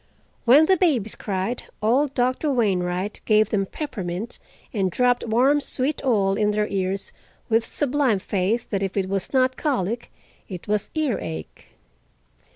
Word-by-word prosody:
When 275 +6 +7
the 375 +3 +4
babies 265 - +2
cried, 195 +4 -3 0.2
old 260 +6 +2
Doctor 255 +4 +1
Wainwright 190 -5 0
gave 215 0 +3
them 195 -2 +1
peppermint 215 - -5 0.3
and 195 -4 +1
dropped 245 +5 +1
warm 260 +6 +3
sweet 275 +2 -2
oil 205 -7 +2
in 210 0 +1
their 210 0 +1
ears 195 0 -2 0.4
with 225 0 +3
sublime 275 -4 +1
faith 200 +4 -1
that 195 -2 0
if 195 0 -3
it 190 -1 +1
was 195 -1 -2
not 260 -1 +2
colic 235 - -2 0.4
it 180 -3 -8
was 210 -1 0
earache. 90 - -3
220 Hz, 145 wpm, -23 LUFS, 195-260 Hz, 0.4 s, When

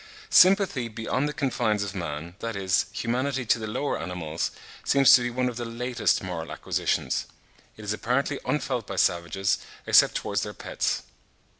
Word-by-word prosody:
Sympathy 185 - +5
beyond 115 +5 -2
the - - -2
confines 120 -7 0
of 100 -2 -5
man, 85 -2 -5
that 115 -1 -4
is, 95 -2 +1
humanity 125 +2 -1
to 115 - +2
the 110 - -4
lower 110 0 -2
animals, 85 -2 -3 0.3
seems 140 -1 +6
to 125 - +7
be 120 - -1
one 125 +1 -1
of 120 -2 -4
the 120 - -3
latest 120 0 0
moral 85 -3 -5
acquisitions. - - -1 0.5
It 110 - -10
is 105 - -1
apparently 130 +6 -1
unfelt 125 -6 -2
by 100 - -5
savages, 90 +2 +1 0.3
except - - +5
towards - - -1
their - - -5
pets. - - -2
115 Hz, 165 wpm, -26 LUFS, 95-125 Hz, 0.5 s, to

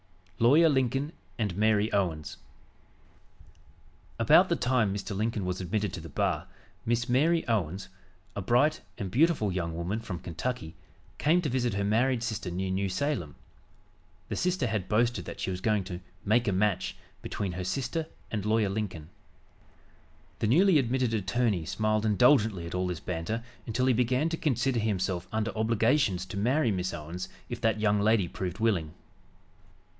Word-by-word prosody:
LAWYER 150 +8 +6
LINCOLN 135 +1 +1 0.3
AND 105 -7 -1
MARY 110 +1 +2
OWENS 85 -6 -1 1.8
About - - +5
the - - +2
time 125 -5 +1
Mr. 100 +1 -4
Lincoln 110 -1 -1
was 90 +1 -2
admitted 100 +1 -1
to - - -4
the 80 - -9
bar, - - -1 0.4
Miss 120 +1 0
Mary 155 +7 +2
Owens, 95 -4 -1 0.5
a 100 - -2
bright 125 +10 +2 0.2
and 95 -3 -4
beautiful 140 - +3
young 85 -3 -2
woman 90 +6 -2
from 110 -6 -5
Kentucky, 90 +2 -4 0.5
came 170 +4 +3
to 150 - 0
visit 120 -4 0
her 100 - 0
married 115 +4 +2
sister 110 -6 -3
near 95 +2 -2
New 95 +1 0
Salem. 115 - -2 0.9
The - - -2
sister 180 -5 0
had 110 -5 -2
boasted 110 -4 +1
that - - -8
she - - -2
was 90 0 -4
going 105 -1 +1
to 90 -1 -6 0.3
"make 115 +3 +3
a - - +3
match" 100 0 0 0.2
between 100 -3 -3
her 90 +1 -4
sister 135 - -2 0.2
and 105 -3 -2
Lawyer 110 -1 +2
Lincoln. 95 -7 -4 1.3
The 110 - +1
newly 170 - +5
admitted 125 -2 0
attorney 105 -3 0
smiled 110 +3 0
indulgently 110 - +4
at 85 - -7
all 90 0 0
this 90 -3 -3
banter 90 +7 -3 0.2
until 125 +3 0
he 130 - +4
began 125 +6 +1
to 165 - -2
consider 135 -4 +1
himself 95 -4 -1
under 110 +1 -2
obligations 110 -3 +2
to 95 +1 -7
marry 125 +4 +2
Miss 95 -1 -1
Owens 85 +3 -6 0.2
if - - -5
that 110 -1 +1
young 105 -1 +2
lady 105 -3 +3
proved 90 +1 -5
willing. 100 -9 0
110 Hz, 160 wpm, -29 LUFS, 95-125 Hz, 1.8 s, LAWYER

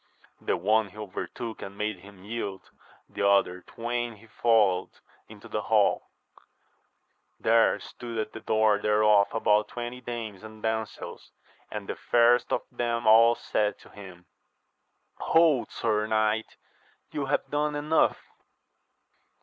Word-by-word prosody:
The - - 0
one 105 +3 +2
he 100 - -18
overtook 105 +3 -6
and 100 +1 -8
made 105 -2 -2
him 100 0 -15
yield, 105 -3 -5 0.4
the - - -5
other 90 -2 +2
twain 120 +3 -4
he 105 +2 -18
followed 110 -5 +2 0.4
into - - -13
the - - -3
hall; - - +2 1.3
there 115 -2 +3
stood 115 +1 -8
at 110 -1 -2
the - - -7
door 110 -1 +2
thereof 105 -1 +4
about 105 -1 +2
twenty 120 +2 -6
dames 115 -5 -6
and 110 0 -12
damsels, 110 -2 -4 0.4
and 105 -2 -6
the - - -4
fairest 120 0 +3
of - - 0
them 120 -1 -2
all 115 +2 +7
said 105 -2 -1
to - - -18
him, 95 -3 -12 0.9
Hold, 160 -6 +3
sir 110 -1 -1
knight, 110 0 0 0.5
you 140 -2 -3
have 140 - 0
done 150 0 0
enough. 150 +2 +1
110 Hz, 135 wpm, -27 LUFS, 105-120 Hz, 1.3 s, all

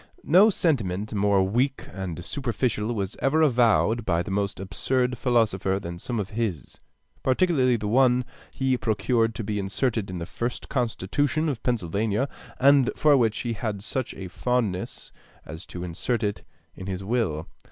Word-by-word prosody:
No 190 +7 +6
sentiment 110 - 0
more 100 -1 +3
weak 125 +8 0
and 90 -3 -5
superficial 120 -4 -1
was 100 -1 -3
ever 155 +4 +3
avowed 120 -4 +3
by 85 -3 +1
the 100 - -6
most 100 0 -1
absurd 125 +8 -1
philosopher 110 -6 +1
than 85 -2 -7
some 120 +4 -3
of 100 0 -4
his, 105 -8 -3 0.4
particularly 130 -3 +3
one 125 +4 +3
that - - -10 0.3
he 130 -1 0
procured 115 0 +1
to 115 - -4
be 105 0 -2
inserted 105 +2 -1
in 90 - -5
the 85 - -4
first 120 +7 -4
constitution 140 - 0
of 135 -7 -2
Pennsylvania, 110 +2 0 0.3
and 140 -1 +5
for 150 -2 +5
which 115 -5 +2
he 120 -2 -2
had 105 -2 -4
such 125 +3 -3
a 95 - -6
fondness 110 -2 -2 0.3
as 80 +4 -9
to 90 - -7
insert 100 +7 -2
it 105 -1 -1 0.3
in 95 - -9
his 95 0 -4
will. 95 -8 -1
110 Hz, 160 wpm, -25 LUFS, 95-125 Hz, 0.4 s, No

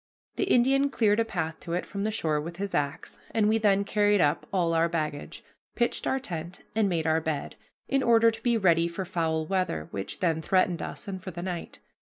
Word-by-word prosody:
The - - +1
Indian 275 -3 +3
cleared 215 -5 +2
a 230 - +2
path 165 -7 -3
to 170 - -6
it 180 - -1
from 200 0 -4
the - - +1
shore 155 -8 0
with 170 +3 -7
his 200 0 -4
axe, 140 -1 -2 0.2
and 215 -2 +3
we 220 +1 +3
then 200 -2 +3
carried 205 0 +2
up 145 -3 +1
all 175 -3 +1
our 165 +1 +3
baggage, 155 -3 -4 0.3
pitched 240 0 0
our 265 - +1
tent, 175 -6 -6
and 215 -2 +2
made 165 -3 -1
our 160 0 +2
bed, 155 -3 -3 0.3
in 275 0 +1
order 230 -2 +5
to 220 - -10
be 235 -2 +2
ready 170 -5 +3
for 170 +3 -4
foul 160 -3 -1
weather, 180 - -1
which 95 0 -5
then 165 -3 +1
threatened 185 0 +1
us, 235 - -5
and 190 -2 -5
for 190 - -6
the 175 -1 -6
night. 175 -2 -5
185 Hz, 220 wpm, -27 LUFS, 165-215 Hz, 0.3 s, order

